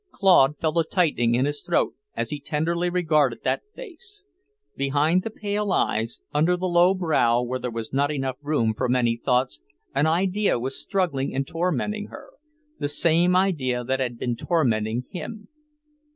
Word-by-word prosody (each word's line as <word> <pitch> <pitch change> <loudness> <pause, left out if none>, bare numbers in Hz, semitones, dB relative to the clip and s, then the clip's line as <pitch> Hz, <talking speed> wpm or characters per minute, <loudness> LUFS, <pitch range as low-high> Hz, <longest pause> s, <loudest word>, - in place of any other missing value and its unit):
Claude 150 -7 +4
felt 160 0 -1
a 165 - +4
tightening 150 -9 +1
in 125 +2 +2
his 145 0 -1
throat - - 0 0.2
as - - -2
he 150 - -3
tenderly 165 +5 -1
regarded 165 -4 +1
that - - 0
face; 410 -2 -10 0.5
behind 145 +6 +2
the 225 - -4
pale 210 -1 -2
eyes, 115 -8 0
under 160 +5 +2
the 185 - -3
low 175 +1 +4
brow 150 -10 +2
where 130 +1 -3
there 125 - -3
was 115 0 -6
not 140 +1 +2 0.3
room 145 -7 +1
for 125 +1 -1
many 120 -2 +2
thoughts, 125 - 0 0.3
an 140 +3 +2
idea 190 +4 +1
was 130 +3 -3
struggling 165 -10 -1
and 135 +1 0
tormenting 180 +7 -2
her. - - -12 0.5
The 145 - -1
same 170 +4 +3
idea 140 -10 +1
that 130 +2 -1
had 125 -2 -2
been 120 0 -2
tormenting 115 -6 0
him. 210 +3 -7
150 Hz, 165 wpm, -24 LUFS, 125-180 Hz, 0.5 s, Claude